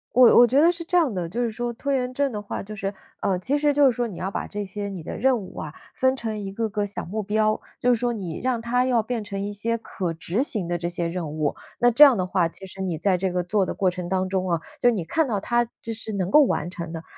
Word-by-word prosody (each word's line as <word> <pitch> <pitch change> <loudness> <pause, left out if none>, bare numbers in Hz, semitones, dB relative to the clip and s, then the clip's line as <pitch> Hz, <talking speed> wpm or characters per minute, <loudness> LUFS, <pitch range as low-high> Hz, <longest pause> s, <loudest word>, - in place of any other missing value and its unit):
我 250 -2 +7
我 240 - +8
觉 275 +4 +4
得 340 +2 +6
是 340 -1 -6
这 360 +1 +2
样 300 -10 +3
的， 175 -3 -2
就 240 +8 -2
是 230 - -1
说， 240 +2 -3
拖 280 +4 -3
延 255 -1 0
症 280 0 0
的 210 -1 -4
话 205 - -5
就 215 +2 -8
是 200 -1 -3 0.3
呃， 190 -2 0
其 270 +10 0
实 290 0 +2
就 290 0 +3
是 260 - +6
说 240 0 -1
你 190 - -8
要 190 +2 -3
把 - - -3
这 205 0 -4
些 200 +1 -5
你 185 -5 -6
的 - - -6
任 260 +2 +3
务 195 -4 -9
啊， 155 -1 -6 0.2
分 260 0 +2
成 220 -4 -4
一 195 -1 -6
个 225 +1 -1
个 205 0 -1
小 205 - -5
目 215 +5 -3
标。 215 +1 +1 0.2
就 245 0 +4
是 230 - 0
说 240 -1 0
你 180 -7 -5
让 250 -3 -1
它 245 +2 +1
要 240 -4 +2
变 235 -1 -3
成 200 -2 -4
一 205 +1 -3
些 230 +3 -1
可 180 -6 -4
执 170 +8 -2
行 210 - -1
的 175 - 0
这 170 0 -3
些 175 -1 -2
任 170 -3 -4
务， 155 -2 0 0.3
那 245 0 +5
这 275 - 0
样 260 -6 +5
的 185 - 0
话 180 -2 +1
其 190 +3 -9
实 190 0 -8
你 175 -4 -2
在 190 0 +2
这 190 +1 0
个 180 -1 0
做 195 +2 +1
的 - - -3
过 190 -2 +1
程 180 -1 -5
当 185 0 0
中 185 -1 -1
啊， 165 -1 0 0.2
就 245 - +5
你 205 -8 -1
看 310 - 0
到 215 -4 0
它 240 +1 +1 0.2
就 230 - -4
是 220 -1 -4
能 190 -1 -2
够 300 - +8
完 175 - 0
成 170 -2 -6
的， 165 0 -6
210 Hz, 320 characters per minute, -24 LUFS, 185-245 Hz, 0.3 s, 我